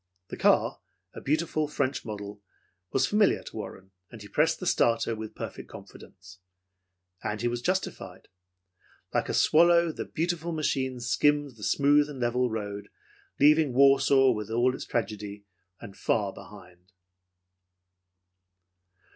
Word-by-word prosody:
The - - -6
car, - - +2 0.3
a - - -9
beautiful 155 +1 0
French 140 -2 -2
model, 105 -1 -7 0.5
was 135 0 +2
familiar 210 +4 +2
to - - -11
Warren, 95 -3 -8 0.2
and 115 - -12
he 105 - -11
pressed 155 +10 +1
the 185 - -6
starter 115 -7 +1
with 110 0 -8
perfect - - -7
confidence. 95 -1 -14 0.8
And 105 - -3
he 120 - -1
was 120 0 -2
justified. 185 +6 -3 0.9
Like - - 0
a - - -1
swallow, 170 +1 +4
the - - -6
beautiful 170 0 -3
machine 130 -5 -1
skimmed 145 +3 +1
the 105 - -13
smooth 145 +4 +3
and 140 -3 -8
level 125 +1 0
road, 105 -2 -5 0.5
leaving 150 -1 +4
Warsaw 135 0 +5
with 105 -2 -4
all 120 +3 +2
its - - -7
tragedy 105 -3 -4 0.3
and 100 -4 -11
far 100 -3 -1
behind. 90 -2 -15
125 Hz, 135 wpm, -27 LUFS, 105-150 Hz, 0.9 s, Warsaw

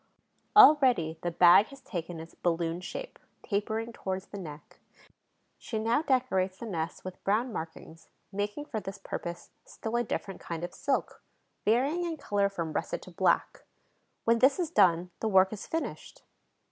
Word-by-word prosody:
Already 260 - +6
the 175 - -1
bag 175 +4 +6
has 275 - -13
taken 175 -8 -6
its 165 +1 -10
balloon 170 0 -1
shape, - - -7 0.2
tapering 220 +3 -2
towards 190 -3 -4
the 200 - -8
neck. 150 -4 -10 0.8
She 225 - -4
now 230 +6 +2
decorates 245 - +1
the 235 - -7
nest 170 -6 -4
with 185 -1 -8
brown 225 +5 +1
markings, 165 -1 -8 0.2
making 205 +8 -3
for 225 - -3
this 195 0 -7
purpose 170 0 -6
still 225 +1 -6
a 240 - +2
different 195 -3 -4
kind 170 -1 -5
of 175 - -5
silk, 280 - -2 0.4
varying 270 +11 +2
in 335 -2 -3
color 205 -7 +1
from 170 -5 -4
russet - - -3
to - - -12
black. - - +1 0.6
When 230 0 +4
this 265 +3 +5
is 345 -4 -2
done, 180 - +4
the 220 - -1
work 190 -1 +4
is 210 - -7
finished. 325 0 -5
200 Hz, 160 wpm, -29 LUFS, 175-245 Hz, 0.8 s, Already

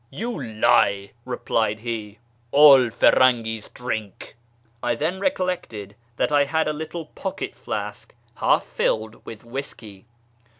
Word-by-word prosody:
" - - -39
You 215 - -4
lie," 100 -3 +2
replied 110 -4 -1
he; 110 -3 -5 0.2
" 120 0 -38
all 140 -4 +8
Firangi's 115 -2 +3
drink." 110 -5 -6 0.5
I 120 -1 0
then 165 +9 -2
recollected 180 - -2 0.2
that - - +1
I 145 -1 +4
had 160 +3 0
a 155 - 0
little 160 +2 -6
pocket - - -5
flask - - -6 0.2
half - - +3
filled 110 0 -2
with 110 -2 -9
whisky. 115 -5 -8
120 Hz, 130 wpm, -23 LUFS, 110-150 Hz, 0.5 s, all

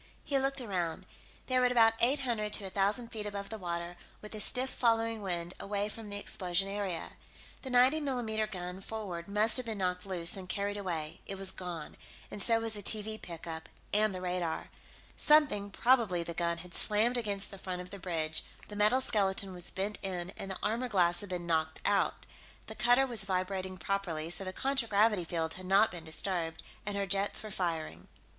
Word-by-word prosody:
He 275 -2 +1
looked 270 +1 +1
around. 180 -9 -2 0.4
They 255 -1 +2
were 250 - +4
at 250 - +3
about 225 -2 +6
eight 275 +4 +5
hundred 220 -5 -1
to 205 - +2
a 190 - -6
thousand 205 +5 +1
feet 215 -2 -5
above 200 -1 -5
the 220 - -6
water, 175 -1 -4 0.2
with 210 - -10
a 215 - -4
stiff 255 +5 +3
following 230 -2 +1
wind 175 -2 -3
away 205 +1 -2
from 220 0 -9
the 205 - -3
explosion 185 -2 +1
area. 195 -4 -3 0.5
The 265 - -6
90 255 +5 +5
mm 225 -6 -1
gun, 180 0 -5
forward, 195 -6 -5
must 210 +4 +3
have 255 -2 -3
been 220 -2 -3
knocked 180 0 -2
loose 175 -3 +2
and 185 -2 -7
carried 200 +1 -1
away; 170 -6 -3
it 195 - -4
was 190 -1 +1
gone, 175 -4 -6 0.3
and 205 - -4
so 230 +1 +6
was 225 -1 -1
the 205 - -4
TV 215 +1 -1
pickup 165 -1 -7 0.2
and 210 -1 +4
the 180 - -5
radar. 180 -2 -2 0.5
Something, 295 -10 +4
probably 220 -6 +2
the 170 - -5
gun, 170 0 -1
had 175 +1 -10
slammed 220 +4 +3
against 205 -4 -1
the 195 - -10
front 185 -1 -4
of 180 0 -8
the 200 - -8
bridge 160 -3 0 0.3
the 210 - -7
metal 210 +5 +4
skeleton 195 -4 +2
was 175 -1 +5
bent 200 +2 -2
in, 180 -2 -2
and 195 - -6
the 190 - -4
armor 230 +4 0
glass 175 -4 +3
had 205 - -6
been 180 -1 -3
knocked 160 -1 0
out. 205 -1 +1 0.4
The - - -7
cutter 245 +3 +4
was 235 -6 0
vibrating 185 0 -2
properly, 170 -3 -2
so 195 - +4
the 185 - -4
contragravity 220 -5 +2
field 165 -1 -2
had 185 0 -8
not 200 +3 +5
been 175 -2 -7
disturbed, 165 0 -1 0.2
and 205 -1 -1
her 200 - 0
jets 195 +2 0
were 215 - -7
firing. 160 - -3
200 Hz, 200 wpm, -32 LUFS, 180-220 Hz, 0.5 s, about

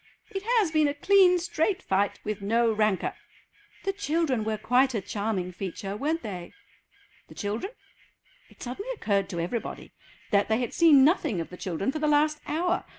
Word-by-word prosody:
"It 390 -2 -3 0.2
has 395 -8 +2
been 310 -2 +3
a 285 - -2
clean 370 +3 +5
straight 350 +2 -1
fight, 195 +1 0
with 210 -1 -4
no 230 +3 +2
rancour." 215 -3 +1 0.7
"The 390 - -1
children 320 - 0
were 215 0 -1
quite 250 +4 +2
a - - +1
charming 200 -2 -3
feature, 195 +2 -5
weren't 310 +9 -1
they?" 180 -5 -7 0.7
The - - -14
children? 220 - -3 0.8
It - - -13
suddenly 260 - -6
occurred 200 - 0
to 170 - -4
everybody 200 +8 -4 0.4
that 200 0 +3
they 220 - +2
had 245 -1 -3
seen 305 -6 +6
nothing 290 - +2
of 165 - -5
the - - -7
children 185 +7 -2
for 310 - -4
the 305 - 0
last 300 +1 +3
hour. 350 +4 0
245 Hz, 175 wpm, -27 LUFS, 205-320 Hz, 0.8 s, seen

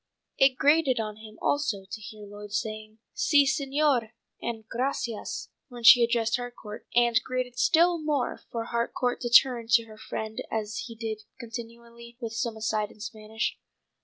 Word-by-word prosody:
It 270 -1 +5
grated 290 -4 +4
on 215 -1 -3
him 215 0 -12
also 240 -10 0
to 200 +3 -8
hear 210 0 -9
Lloyd 205 0 -10
saying, 215 0 -4 0.2
"Si, 285 -2 +4
señor" 275 -4 +1 0.3
and 225 -2 -5
"gracias" 240 -2 -3 0.2
when 245 -2 -10
she 240 +1 +9
addressed 230 0 +2
Harcourt, 240 -3 -8
and 240 0 +4
grated 255 -1 -3
still 340 +1 +4
more 300 -4 -1
for 230 -1 -3
Harcourt 235 +1 -1
to 240 - -2
turn 240 -1 +5
to 230 0 +5
her 215 -1 -14 0.5
as 215 0 -3
he 230 - -9
did 220 -1 -4 0.2
continually 235 0 -9
with 230 -3 -5
some 225 0 -2
aside 215 -1 -1
in - - -17
Spanish. 215 +1 -4
235 Hz, 155 wpm, -27 LUFS, 220-250 Hz, 0.5 s, she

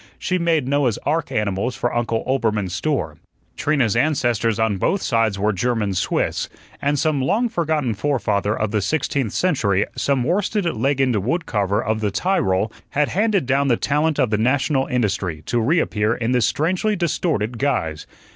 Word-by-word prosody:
She 185 0 -1
made 165 -6 +1
Noah's 140 -5 +1
ark 155 0 0
animals 105 +3 -1
for 120 - -2
Uncle 115 -1 -1
Oelbermann's 110 -8 0
store. 95 - -2 0.4
Trina's 135 -8 +1
ancestors 120 -5 +1
on 110 -3 +1
both 195 - +1
sides 115 -4 +1
were 105 +2 +1
German 105 0 0
Swiss, 90 - -1 0.3
and 145 +1 +1
some 150 -1 +1
long 215 - +1
forgotten 155 - 0
forefather 105 -4 0
of 110 -1 -1
the 105 -1 +1
sixteenth 135 -2 -1
century, 105 - +1
some 135 -3 +1
worsted 195 - 0
leggined 135 -4 +1
wood 130 - -1
carver 105 0 0
of 110 0 -1
the 105 - +1
Tyrol, 105 - 0 0.2
had 145 0 +1
handed 205 -4 +1
down 140 +2 +1
the 120 -3 +3
talent 150 +2 0
of 130 -6 +1
the 105 - +1
national 135 +3 +1
industry, 100 - -1
to 120 - 0
reappear 115 -6 +1
in 115 0 -2
this 125 -3 +3
strangely 185 +7 0
distorted 150 - -1
guise. 80 - -1
125 Hz, 165 wpm, -21 LUFS, 105-150 Hz, 0.4 s, the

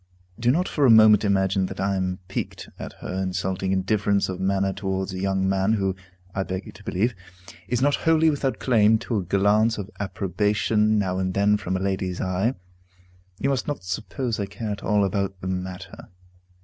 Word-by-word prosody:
Do 120 +1 +2
not 175 +8 +2
for 145 - -1
a 130 - +6
moment 110 -2 +7
imagine 95 -2 +2
that - - -8
I 100 0 0
am 95 -1 -1
piqued 100 - -5
at - - -7
her 95 +1 -3
insulting 95 0 -2
indifference 100 +1 +1
of 95 -1 -4
manner 95 0 +1
towards 95 -1 -3
a 95 - -4
young 95 0 0
man 95 +2 +2
who 95 -3 0 0.4
(I 95 - -1
beg 95 0 -4
you - - -9
to - - -16
believe) 115 +7 0 0.5
is 125 +1 0
not 145 +1 +3
wholly 160 0 +3
without 140 -2 -1
claim 110 -3 +4
to 115 0 -3
a 100 - -1
glance 100 +5 +2
of 100 0 -6
approbation 105 +3 +1
now 95 -2 0
and 95 -1 -2
then 100 +1 +4
from 95 -3 -2
a - - -3
lady's 95 -2 -2
eye. 95 +7 0 0.8
You 135 +7 0
must 135 - -1
not 145 -9 -3
suppose 110 +5 -3
I 100 - -2
care 105 +2 -5
at 100 - -5
all 105 -2 +2
about 100 -1 -2
the 95 - -6
matter. 95 0 -6
100 Hz, 195 wpm, -24 LUFS, 95-110 Hz, 0.8 s, moment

